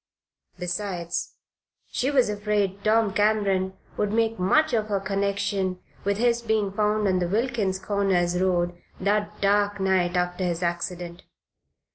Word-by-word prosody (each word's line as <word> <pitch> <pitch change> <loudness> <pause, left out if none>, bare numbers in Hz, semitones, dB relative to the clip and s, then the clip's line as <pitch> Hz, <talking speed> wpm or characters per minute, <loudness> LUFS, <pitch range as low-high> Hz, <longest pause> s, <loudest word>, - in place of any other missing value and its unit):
Besides, 180 -1 -3 0.6
she 260 - 0
was 270 -4 +3
afraid 205 -1 -1
Tom 215 -2 +3
Cameron 200 -3 +2 0.2
would 205 -1 0
make 225 -1 +1
much 310 +12 +3
of 215 -2 +1
her 200 -2 0
connection 195 -1 -1 0.2
with 200 0 0
his 235 +1 +2
being 220 -3 0
found 210 0 +1
on 185 -1 +2
the 175 - 0
Wilkins 215 -2 0
Corners 185 -3 +1
road 175 -2 +1 0.2
that 205 +2 0
dark 205 0 +2
night, 185 -2 +1
after 180 +1 -1
his 175 -1 -1
accident. 175 0 -3
200 Hz, 135 wpm, -25 LUFS, 185-210 Hz, 0.6 s, was